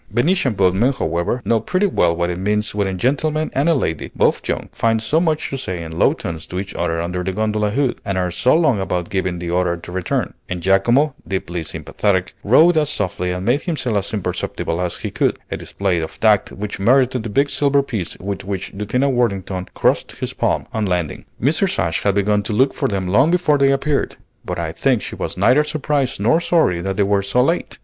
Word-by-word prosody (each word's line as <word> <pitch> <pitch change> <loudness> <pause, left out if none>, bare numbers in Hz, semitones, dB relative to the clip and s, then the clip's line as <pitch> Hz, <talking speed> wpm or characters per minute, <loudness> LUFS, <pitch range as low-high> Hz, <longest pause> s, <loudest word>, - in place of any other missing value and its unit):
Venetian 130 - +1
boatmen, 100 +7 +3
however, 85 +5 -2
know 115 - +2
pretty 185 - 0
well 85 - +2
what 85 +1 -1
it 90 - -4
means 105 +2 0
when 100 -1 0
a 95 - -2
gentleman 150 - 0
and 145 +5 +2
lady, 80 - -2
both - - +1
young, - - -2
find 115 -1 +1
so 150 +8 +1
much 160 -3 0
to 135 - -3
say 90 -8 -4
in 80 - -8
low - - +5
tones 80 -1 -6
to 90 - -4
each 100 0 -6
other 85 -1 -1
under 90 +2 -2
the 95 - -1
gondola 105 +1 0
hood, 130 +3 -1
and 100 -1 -2
are 90 -1 0
so 125 - +3
long 155 -10 +3
about 90 -2 -2
giving 95 -2 -1
the 85 0 -4
order 90 -1 +1
to 85 - -10
return; 90 -1 -2 0.2
and 90 -1 -3
Giacomo, 120 - +3
deeply 90 -3 -3
sympathetic, 95 +2 -1
rowed 160 +10 +5
as 150 -1 0
softly 90 -6 -2
and 90 +1 -3
made 125 +6 +2
himself 145 - -2
as 100 -1 -1
imperceptible 90 -3 -3
as 90 -1 -2
he - - -5
could, - - 0
a - - -1
display 95 -3 -1
of 80 - -6
tact 105 -3 +3
which 105 -1 -5
merited 125 +3 +3
the 110 - -5
big 140 +7 +2
silver 140 0 +2
piece 110 -10 -4
with 100 +1 -5
which 95 -2 -5
Lieutenant 125 +7 0
Worthington 100 -6 -1
"crossed - - +1
his - - -5
palm" - - 0
on 110 -2 -1
landing. 90 -4 -2
Mrs. 160 - +1
Ashe 80 -1 0
had 100 -1 +1
begun 105 +1 +2
to 105 - -4
look 130 +5 +3
for - - -1
them 95 -3 -2
long 125 - +4
before 170 -5 +2
they 135 0 +4
appeared, 140 +1 0 0.3
but - - -4
I - - -2
think - - +1
she - - -6
was - - -4
neither 125 +10 +4
surprised 145 -4 -1
nor 120 +11 +3
sorry 160 - +2
that 95 +1 -3
they 100 - +3
were 100 0 +2
so 100 +6 +2
late. 165 +6 -1
105 Hz, 220 wpm, -19 LUFS, 90-135 Hz, 0.3 s, low